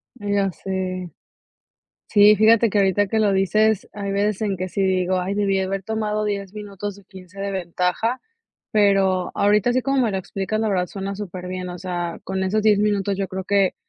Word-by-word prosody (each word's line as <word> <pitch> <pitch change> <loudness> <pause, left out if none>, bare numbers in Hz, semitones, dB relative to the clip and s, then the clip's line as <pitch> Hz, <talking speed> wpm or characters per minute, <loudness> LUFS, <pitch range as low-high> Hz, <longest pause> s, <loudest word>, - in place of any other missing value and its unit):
Ya 205 -3 0
sé. 185 -1 -4 1.0
Sí, 210 0 +6
fíjate 225 +2 +5
que 205 - +1
ahorita 200 +1 +3
que 220 - 0
lo 210 -2 +3
dices, 215 +2 +2
hay 200 -1 -4
veces 205 +1 0
en 200 -3 0
que 185 +1 -4
si 195 - -2
digo: 185 -1 +1
"Ay, 185 +2 -2
debí 200 -1 +1
haber 190 +1 -2
tomado 215 0 -2
10 200 -2 -3
minutos 205 -1 -6
o 200 - -18
15 190 0 -12
de 200 0 -2
ventaja. 185 +6 -1 0.5
Pero 195 -3 +2
ahorita 210 +3 +3
así 255 +1 +2
como 275 0 +1
me 230 - +1
lo 190 - -1
explicas, 195 +3 -3
la 220 - 0
verdad, 185 -3 0
suena 195 +1 -5
superbién. 185 -2 -6
O 180 0 -7
sea, 175 -2 -4
con 190 0 -2
esos 205 +3 0
10 210 -1 +4
minutos, 200 -1 +1
yo 195 0 -2
creo 190 0 -5
que 200 -1 +2
195 Hz, 195 wpm, -22 LUFS, 185-210 Hz, 1.0 s, Sí